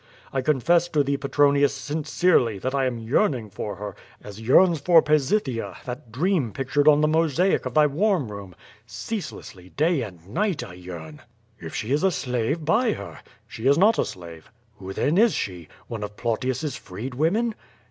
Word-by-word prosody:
I 135 - 0
confess 155 +5 +2
to 150 -4 +1
thee, 140 +1 0
Petronius, 140 0 +2
sincerely, 150 - +1
that 130 +7 -3
I 135 -1 +1
am 125 -2 -3
yearning 115 - 0
for 105 0 -5
her, 105 +1 -7 0.2
as 105 +1 -11
yeama - - -10
QUO 140 +10 +6
TADI8. - - 0
II 165 - -1
for 165 +2 +5
raisythea, 135 - 0
that 125 -2 -7
dream 150 - 0
pictured 140 +2 0
on 150 -1 +6
the 155 - +3
mosaic 165 +3 +1
of - - -8
thy 155 -1 +6
warm 155 - +1
room. 100 -3 -9 0.3
Ceaselessly, 110 - -7
day 155 0 +2
and 90 -6 -9
night 190 - -1
I 90 - -10
yearn." 85 -4 -9 0.4
"If - - -8
she 110 - -3
is 145 +5 +1
a 190 - +5
slave, 125 -1 -2
l)uy 220 +9 +2
her." 95 -5 -9 0.3
"She 115 +4 -4
is 140 +2 +5
not 210 +6 +4
a - - +2
slave." 85 -3 -10 0.3
"Who 95 -2 -8
then 150 - +1
is 230 0 +4
she? 90 -5 -4 0.2
One 115 -2 -6
of 105 0 -6
Plautius's 130 +5 -2
freed 110 +8 -7
women?" 200 - +1
135 Hz, 190 wpm, -24 LUFS, 105-160 Hz, 0.4 s, QUO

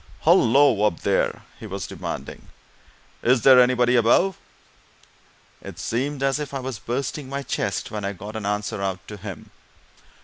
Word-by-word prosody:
"Hullo, 135 - +5
up 85 - -4
there!" - - 0 0.2
he - - -8
was - - -5
demanding. - - -7 0.7
"Is 125 -1 +2
there 130 -2 +8
anybody 125 0 +4
above?" 125 - +3 1.3
It - - -10
seemed 135 +4 -2
as 135 +2 +1
if 145 -2 -5
I - - -2
was 130 -4 -5
bursting 130 +4 -4
my 140 +1 -4
chest 100 -6 -3
when 105 -1 -4
I 100 +1 -2
got 105 +4 -9
an 105 -2 -4
answer 105 0 -2
out 95 -2 -3
to 105 - -7
him. 95 - -9
120 Hz, 160 wpm, -23 LUFS, 105-135 Hz, 1.3 s, there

